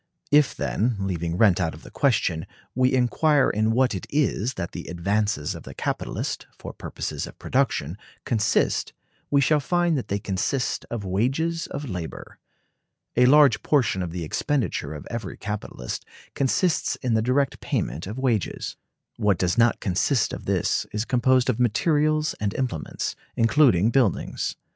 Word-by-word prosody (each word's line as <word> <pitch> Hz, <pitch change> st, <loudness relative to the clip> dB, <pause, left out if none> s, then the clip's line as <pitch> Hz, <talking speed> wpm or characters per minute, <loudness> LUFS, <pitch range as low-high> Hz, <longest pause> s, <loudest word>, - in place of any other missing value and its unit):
If, 145 Hz, -1 st, +4 dB
then, 115 Hz, +3 st, 0 dB
leaving 85 Hz, -3 st, -2 dB
rent 100 Hz, -3 st, +4 dB
out 80 Hz, -3 st, -1 dB
of 80 Hz, -, -14 dB
the -, -, -12 dB
question, 95 Hz, -, +1 dB, 0.3 s
we 130 Hz, +1 st, +3 dB
inquire 135 Hz, +3 st, +3 dB
in 110 Hz, +1 st, +1 dB
what 125 Hz, +2 st, +2 dB
it 95 Hz, -, -5 dB
is 130 Hz, -4 st, 0 dB
that 85 Hz, -2 st, -4 dB
the 85 Hz, -, -7 dB
advances 100 Hz, -1 st, -1 dB
of -, -, -8 dB
the -, -, -11 dB
capitalist, -, -, -3 dB
for -, -, -8 dB
purposes -, -, -5 dB
of -, -, -12 dB
production, 110 Hz, -, -1 dB, 0.3 s
consist, 110 Hz, -3 st, +1 dB, 0.4 s
we 140 Hz, -1 st, +4 dB
shall 150 Hz, +2 st, +3 dB
find 175 Hz, +3 st, +1 dB
that -, -, -7 dB
they 100 Hz, -, -1 dB
consist 105 Hz, +7 st, -2 dB
of 115 Hz, -4 st, -4 dB
wages 135 Hz, -, 0 dB
of 145 Hz, 0 st, -5 dB
labor. 90 Hz, -6 st, -7 dB, 0.8 s
A 125 Hz, +1 st, +5 dB
large 140 Hz, -3 st, +6 dB
portion 125 Hz, -10 st, +2 dB
of 90 Hz, -, -3 dB
the 85 Hz, 0 st, -5 dB
expenditure 80 Hz, -, -1 dB
of 75 Hz, -, -8 dB
every 115 Hz, -1 st, -5 dB
capitalist 100 Hz, -, -5 dB, 0.3 s
consists 150 Hz, +5 st, +1 dB
in 125 Hz, -3 st, +1 dB
the 110 Hz, -, +3 dB
direct 130 Hz, +3 st, +1 dB
payment 75 Hz, +9 st, -2 dB
of 105 Hz, +5 st, -6 dB
wages. 120 Hz, -7 st, -1 dB, 0.4 s
What 100 Hz, -3 st, +2 dB
does 90 Hz, +2 st, +1 dB
not 120 Hz, 0 st, +3 dB
consist 105 Hz, +5 st, +1 dB
of -, -, -7 dB
this -, -, 0 dB
is 105 Hz, +2 st, -2 dB
composed 125 Hz, 0 st, +3 dB
of 125 Hz, -3 st, 0 dB
materials 150 Hz, +6 st, +2 dB
and 105 Hz, -1 st, -2 dB
implements, 125 Hz, -, -3 dB, 0.2 s
including 115 Hz, -, +4 dB
buildings. 120 Hz, -7 st, 0 dB
115 Hz, 160 wpm, -25 LUFS, 95-135 Hz, 0.8 s, large